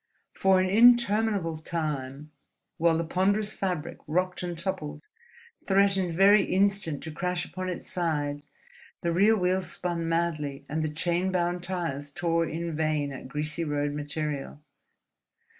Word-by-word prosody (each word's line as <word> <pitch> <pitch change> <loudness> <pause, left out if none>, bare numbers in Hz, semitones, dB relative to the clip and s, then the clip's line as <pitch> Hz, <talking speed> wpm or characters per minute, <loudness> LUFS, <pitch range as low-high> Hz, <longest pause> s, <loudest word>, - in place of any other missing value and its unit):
For 190 -1 +3
an 185 - +2
interminable 215 -5 +4
time, 150 -3 -4 0.5
while 165 0 +3
the 165 - 0
ponderous 200 +5 +1
fabric 175 -4 -3
rocked 180 +4 0
and 175 -2 -4
toppled, 170 -4 -3 0.6
threatening 195 -2 +3
very 195 +4 +6
instant 195 -5 +1
to 160 - -5
crash 180 +3 -2
upon 185 0 -5
its 180 - -5
side, 145 -5 -2 0.6
the 170 - 0
rear 205 +5 +4
wheels 180 -2 0
spun 170 -2 -2
madly 155 -5 -1
and 155 +2 -2
the 155 - -1
chain 175 +4 0
bound 175 -1 0
tires 165 -6 -3
tore 165 +2 0
in 165 0 -4
vain 155 -2 0
at 130 - -8
greasy 150 +4 -3
road 145 -1 -1
metal. 150 -1 -3
170 Hz, 140 wpm, -27 LUFS, 150-185 Hz, 0.6 s, very